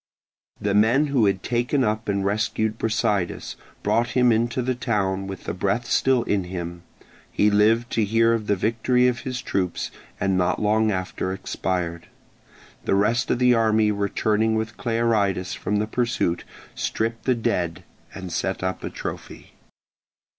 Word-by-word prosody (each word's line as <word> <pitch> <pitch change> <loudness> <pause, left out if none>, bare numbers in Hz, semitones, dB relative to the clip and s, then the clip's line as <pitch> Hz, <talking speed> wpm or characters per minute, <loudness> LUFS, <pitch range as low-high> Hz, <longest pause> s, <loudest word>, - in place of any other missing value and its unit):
The 100 -1 0
men 115 +8 +4
who 115 -6 +4
had 95 -1 0
taken 125 +3 +1
up 110 -1 -1
and 100 -1 0
rescued 110 +2 0
Brasidas, 105 -5 -1 0.3
brought 115 +1 +2
him 125 -1 +5
into 115 +2 +1
the 130 +1 0
town 100 -6 -1
with 95 -1 -7
the - - -3
breath 100 +6 -1
still 130 0 +2
in 100 -3 0
him: 85 -1 -6 0.5
he 105 - +3
lived 110 +3 +3
to 115 - +1
hear 115 +2 +3
of 110 -2 -2
the 100 - +3
victory 115 +5 +2
of 125 -1 0
his 130 -2 -5
troops, 90 -7 -2 0.3
and 95 -1 +1
not 90 - +1
long 110 +1 +2
after 95 -1 -3
expired. 90 -3 -3 0.8
The - - +2
rest 115 +6 +2
of - - +2
the 125 0 +4
army 110 -2 +3
returning 105 +2 +1
with 110 0 -2
Clearidas 110 -6 0
from 105 - -2
the 105 +1 +1
pursuit 110 -6 -1 0.3
stripped 115 +1 -2
the 130 - +3
dead 90 -6 -1 0.3
and 95 -3 -7
set 95 -1 -2
up 95 0 -2
a - - -3
trophy. - - -7
110 Hz, 160 wpm, -24 LUFS, 95-115 Hz, 0.8 s, him